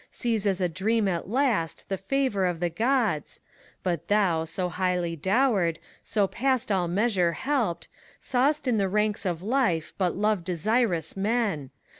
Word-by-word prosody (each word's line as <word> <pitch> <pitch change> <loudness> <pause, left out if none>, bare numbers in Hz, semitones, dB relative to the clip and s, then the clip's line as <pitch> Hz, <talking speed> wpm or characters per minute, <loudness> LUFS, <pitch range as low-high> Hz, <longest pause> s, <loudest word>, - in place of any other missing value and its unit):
Sees 225 -4 -1
as 195 -2 +1
a 180 - +2
dream 205 +5 0
at 175 -1 -2
last 235 - 0
the 195 - -1
favor 235 -4 0
of 175 -2 -2
the 175 0 -1
Qods, 225 - 0 0.4
But 175 -5 -2
thou, 185 -6 +2
so 180 +3 -2
highly 180 -1 -1
dowered, 190 - +2 0.3
so 205 -2 +1
past 255 +2 0
all 185 -3 +1
measure 185 -2 +1
helped, 240 - -1 0.3
Saw'st 280 +3 +1
in 240 -3 +2
the 195 -2 +1
ranks 210 0 0
of 175 -1 -3
life 215 - 0
but 180 -2 +1
love 210 -3 +1
desirous 185 +1 0
men. 200 - 0
195 Hz, 155 wpm, -26 LUFS, 175-230 Hz, 0.4 s, a